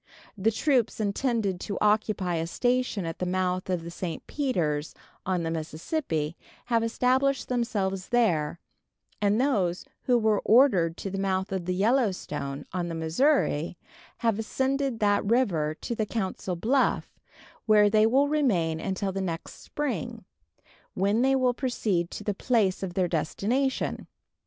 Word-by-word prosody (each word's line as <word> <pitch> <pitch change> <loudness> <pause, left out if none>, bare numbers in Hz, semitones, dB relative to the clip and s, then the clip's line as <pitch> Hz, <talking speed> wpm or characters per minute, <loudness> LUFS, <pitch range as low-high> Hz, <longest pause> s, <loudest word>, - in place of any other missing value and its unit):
The 205 +2 +2
troops 240 0 +1
intended 210 -2 0
to 200 - -4
occupy 210 -4 +1
a 165 0 -2
station 245 -1 0
at 165 0 -5
the 180 - -1
mouth 185 0 -1
of 180 -3 -1
the 170 - -7
St. 170 -1 -5
Peters, 160 - -1 0.3
on 185 -2 0
the 165 - -2
Mississippi, 160 - -3 0.3
have 230 -2 +1
established 255 +3 +1
themselves 200 -6 -1
there, 170 -10 +1 0.6
and 205 +2 +2
those 195 -10 +1 0.2
who 250 -1 +4
were 220 -3 +2
ordered 200 -10 +4
to 195 - -5
the 195 - -3
mouth 190 -1 -1
of 190 -3 -2
the 180 0 -1
Yellow 225 +3 +3
Stone, 140 -6 -5
on 180 -2 -1
the 165 - -4
Missouri, 165 - +1 0.4
have 225 -2 0
ascended 265 +3 -1
that 205 -1 +3
river 190 -10 +1
to 240 - -3
the 220 -2 -2
Council 190 -4 -3
Bluff, 255 +10 0 0.5
where 210 -1 +6
they 215 +1 +4
will 270 +5 +3
remain 195 - +1
until 190 +2 -2
the 195 +1 -3
next 170 -3 -5
spring, 295 -3 -4 0.7
when 200 +4 +2
they 270 +1 +3
will 255 -2 +2
proceed 210 -9 -1
to - - -7
the 205 - -1
place 205 -3 +1
of 180 -3 -4
their 185 -2 +2
destination. 220 - -1
200 Hz, 150 wpm, -27 LUFS, 175-245 Hz, 0.7 s, where